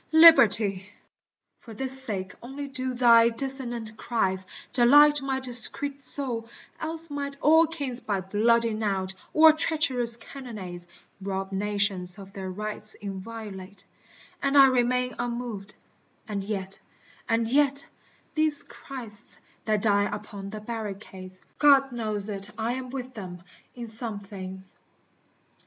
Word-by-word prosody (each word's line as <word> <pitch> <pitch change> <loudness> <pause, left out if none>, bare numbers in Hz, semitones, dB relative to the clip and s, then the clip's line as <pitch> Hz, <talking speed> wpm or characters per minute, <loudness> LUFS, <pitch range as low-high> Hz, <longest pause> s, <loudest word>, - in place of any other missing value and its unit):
Liberty! 215 - +7 0.7
For 225 -3 -13
this 265 +2 +1
sake 195 -6 -4
only 275 +4 -7
do 260 -1 -3
thy 235 -1 +5
dissonant 240 -3 0
cries 190 -6 -1 0.3
Delight 290 +4 +6
my 270 -1 -2
discreet 265 +3 +4
soul, 250 -4 -2 0.3
else 320 0 0
might 280 -1 -5
all 320 +2 +5
kings 280 -6 -3
By 200 -2 -2
bloody 225 +4 +1
knout 195 -3 -2 0.2
or 315 0 +7
treacherous 270 -7 +3
cannonades 210 -9 -9 0.3
Rob 195 0 -4
nations 195 -2 -2
of 195 -1 -12
their 190 -2 -6
rights 210 +2 -4
inviolate 200 -1 -9 0.6
And 280 +1 +1
I 275 - +9
remain 250 -1 +1
unmoved 235 -4 -5 0.3
— - - -40
and 205 -3 -4
yet, 195 -2 -5 0.5
and 225 0 +1
yet, 280 +2 +1 0.5
These 310 -2 +3
Christs 235 -7 -9 0.3
that 215 -2 0
die 205 -2 +2
upon 205 -1 -7
the 215 +1 -8
barricades, 200 -4 -8 0.2
God 275 -2 +5
knows 215 -4 -4
it 200 -1 -5
I 225 +2 -2
am 255 0 -6
with 255 0 -7
them, 180 -5 -9 0.3
in 240 -1 -7
some 220 -1 -6
things. 190 -1 -10
230 Hz, 130 wpm, -26 LUFS, 200-265 Hz, 0.7 s, I